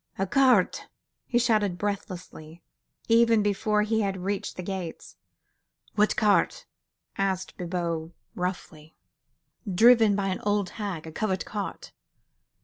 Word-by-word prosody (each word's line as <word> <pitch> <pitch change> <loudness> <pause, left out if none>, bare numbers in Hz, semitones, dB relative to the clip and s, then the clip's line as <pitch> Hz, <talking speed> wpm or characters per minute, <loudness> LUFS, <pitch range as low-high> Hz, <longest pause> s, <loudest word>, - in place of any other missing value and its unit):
"A 195 - 0
cart,.. 255 -6 +3 0.2
." - - -56
he 240 - +1
shouted 215 -6 +2
breathlessly, 180 -5 -6 0.4
even 230 -1 +4
before 210 +1 +1
he 220 +1 0
had 195 -2 -1
reached 200 +1 -3
the 180 - -5
gates. 185 -3 -6 0.8
"What 210 0 +2
cart?" 210 -1 +2 0.5
asked 190 -1 -1
Bibot, 170 -2 -3 0.2
roughly. 170 -4 -5 0.8
"Driven 225 +1 +6
by 195 -1 -1
an 185 - -2
old 205 -2 0
hag.... 185 -7 -4
A 160 - -8
covered 190 +1 -2
cart. 205 -2 -6
195 Hz, 125 wpm, -26 LUFS, 180-215 Hz, 0.8 s, Driven